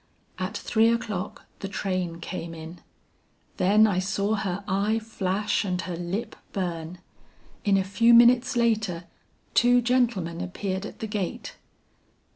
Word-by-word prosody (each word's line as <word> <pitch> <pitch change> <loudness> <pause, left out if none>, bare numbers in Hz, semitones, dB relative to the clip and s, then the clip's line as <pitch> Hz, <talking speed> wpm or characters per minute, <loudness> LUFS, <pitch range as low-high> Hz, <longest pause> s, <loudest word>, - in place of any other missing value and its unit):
"At - - -3
three 225 0 +3
o'clock 215 -5 -3
the 195 - -4
train 185 -3 -2
came 170 -2 -5
in. 160 +2 -9 0.8
Then 205 +4 +5
I 195 -4 +1
saw 200 +2 0
her 200 -2 -2
eye 205 +3 +1
flash 210 -2 -1
and 180 -3 -2
her 170 0 -5
lip 190 +7 -4 0.2
burn. 175 -2 -3 0.7
In 200 -3 +3
a 190 - +2
few 200 +5 +3
minutes 240 +2 +6
later 215 -7 +1 0.5
two 245 +1 +5
gentlemen 235 -9 +1
appeared 190 +2 -3
at - - -12
the 220 - -2
gate. 205 -4 -4
200 Hz, 135 wpm, -26 LUFS, 180-220 Hz, 0.8 s, minutes